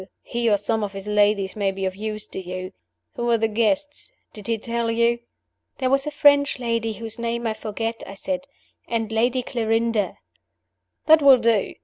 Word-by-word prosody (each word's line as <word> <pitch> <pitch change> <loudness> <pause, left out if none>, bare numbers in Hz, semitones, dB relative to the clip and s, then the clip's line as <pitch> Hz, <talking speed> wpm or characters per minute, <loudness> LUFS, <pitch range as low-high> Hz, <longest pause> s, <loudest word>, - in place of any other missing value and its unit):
He 235 -1 -1
or 205 - +4
some 220 +2 -1
of 200 -1 -4
his 195 0 -7
ladies 205 -2 +2
may 200 -2 +1
be 195 0 -4
of 185 0 -2
use 215 +1 -5
to - - -7
you. 185 0 -6 0.4
Who 240 0 -1
are 235 - +4
the 225 0 +1
guests? 285 - -1 0.2
Did 210 -2 -10
he 230 -1 +1
tell 235 +1 -2
you?" 235 +1 +2 0.6
"There 260 -1 0
was 275 +1 +2
a - - +1
French 285 -1 +4
lady 230 -2 -1
whose 225 +1 -7
name 235 0 -2
I 220 - 0
forget," 225 +1 -4
I 195 - -8
said, 275 +6 -4 0.4
"and 225 -2 -2
Lady 245 +3 +1
Clarinda 225 -3 0 0.4
" - - -55
"That 315 0 +7
will 275 -2 +8
do! 230 -4 +1
230 Hz, 195 wpm, -23 LUFS, 210-240 Hz, 0.6 s, will